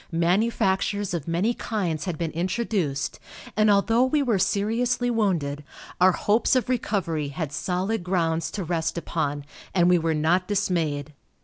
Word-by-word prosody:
Manufactures 190 +2 +1
of 170 -4 -3
many 180 +8 +1
kinds 180 -11 -2
had 175 -4 -3
been 165 -1 -2
introduced, 175 -4 -2 0.4
and 215 0 +4
although 225 +4 +4
we 280 +3 +2
were 230 -7 +1
seriously 240 +6 +1
wounded, 165 -10 0 0.4
our 185 +1 +6
hopes 215 +8 +2
of 255 0 +1
recovery 185 - -1
had 140 +1 -4
solid 185 +7 -2
grounds 165 -3 0
to 195 +3 -4
rest 165 0 -2
upon, 145 -4 -2 0.3
and 175 -1 +4
we 180 -1 +5
were 160 -1 0
not 170 +4 +2
dismayed. 165 -8 -1
180 Hz, 145 wpm, -25 LUFS, 160-210 Hz, 0.4 s, our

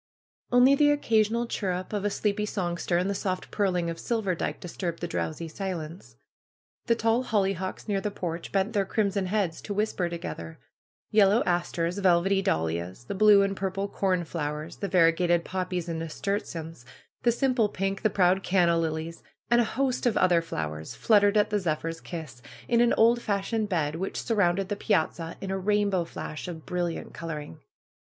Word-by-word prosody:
Only 245 +2 +6
the 290 +1 +4
occa 290 -7 +3
sional 235 +3 -2
chirrup 185 -3 -3
of 205 -2 -1
a 205 - +1
sleepy 210 +1 -1
songster 175 -3 -1
and 180 +2 +1
the 200 - 0
soft 185 -2 -3
purling 180 -4 0
of 165 0 -3
Silverdike 205 -7 -1
disturbed 175 -1 -4
the 175 - -3
drowsy 165 0 -3
silence. 170 -1 -6 0.7
The 230 - +4
tall 230 +2 +1
hollyhocks 195 -4 -1
near 200 -2 0
the 210 - -1
porch 170 -4 -5
bent 195 +3 0
their 200 -2 +2
crimson 200 -1 0
heads 190 -4 -1
to 205 - -5
whisper 205 -4 0
together. 85 - -6 0.5
Yellow 210 +1 +5
asters, 175 0 -1
velvety 190 +1 +3
dahlias, 85 - -2
the 120 - -5
blue 205 0 +6
and 195 0 -1
purple 195 +1 -2
cornflowers, 165 -6 -2
the 200 - -3
variegated 175 -1 +3
poppies 180 -2 -3
and 165 -1 -3
nasturtiums, 165 - -4 0.4
the 240 - +4
simple 245 -3 +2
pink, 195 0 -2
the 215 - +3
proud 190 -1 +3
canna 175 -3 +3
lilies, 160 0 -3 0.3
and 240 0 +6
a 230 - -3
host 260 -2 +1
of 225 - +1
other 175 -2 +4
flowers 80 - -5
fluttered 205 -1 +4
at 210 - +3
the 210 - +2
zephyr's 165 -2 -2
kiss, 155 -8 -8 0.3
in 235 0 +3
an 240 - +4
old 235 +2 +4
fashioned 210 +1 -1
bed 155 -6 0
which 190 +3 -3
surrounded 195 -4 +1
the 205 - -1
piazza 165 -3 -1
in 195 - -4
a 195 - -1
rainbow 200 -2 +1
flash 155 0 -7
of 165 -3 -7
brilliant 175 -2 -3
coloring. 150 - -6
190 Hz, 170 wpm, -27 LUFS, 170-205 Hz, 0.7 s, Only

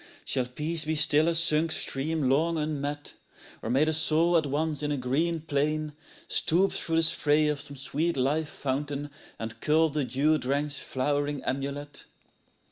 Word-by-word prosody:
Shall 130 -2 0
Peace 155 +5 -2
be 160 +1 -1
still 150 +1 +4
a 170 - +1
sunk 165 0 +5
stream 150 +1 0
long 160 +5 +1
unmet, 145 -1 -4 0.4
â - - -29
Or 110 - -5
may 130 +5 +2
the 160 0 +1
soul 160 +2 +3
at 160 -3 +2
once 150 +1 -2
in 150 0 -2
a 145 - -1
green 155 +6 -1
plain 150 0 -2 0.3
Stoop 185 +4 +2
through 165 - -1
the 165 - +4
spray 155 -2 +4
of 150 -1 -2
some 145 0 -6
sweet 150 +4 -1
life 145 +4 0
fountain 145 +1 -4 0.3
And 115 0 -7
cull 160 +1 +2
the 150 0 -1
dew 140 +5 +1
drenched 140 +2 -1
flowering 145 +1 -2
amulet? 140 +1 -4
150 Hz, 170 wpm, -27 LUFS, 140-160 Hz, 0.4 s, sunk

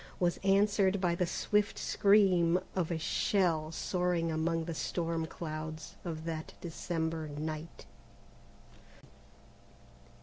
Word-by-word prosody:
was 175 -1 +1
answered 200 0 +3
by 175 -2 +2
the 175 0 0
swift 210 +3 +1
scream 185 -4 +4 0.2
of 180 -4 0
a 170 - -1
shell 160 -2 +1
soaring 175 -1 0
among 165 +1 0
the 170 - -3
storm 165 0 -2
clouds 155 -1 -6
of 160 -2 -5
that 160 -1 -5
December 160 -1 -3
night. 155 +2 -6
170 Hz, 105 wpm, -32 LUFS, 160-185 Hz, 0.2 s, scream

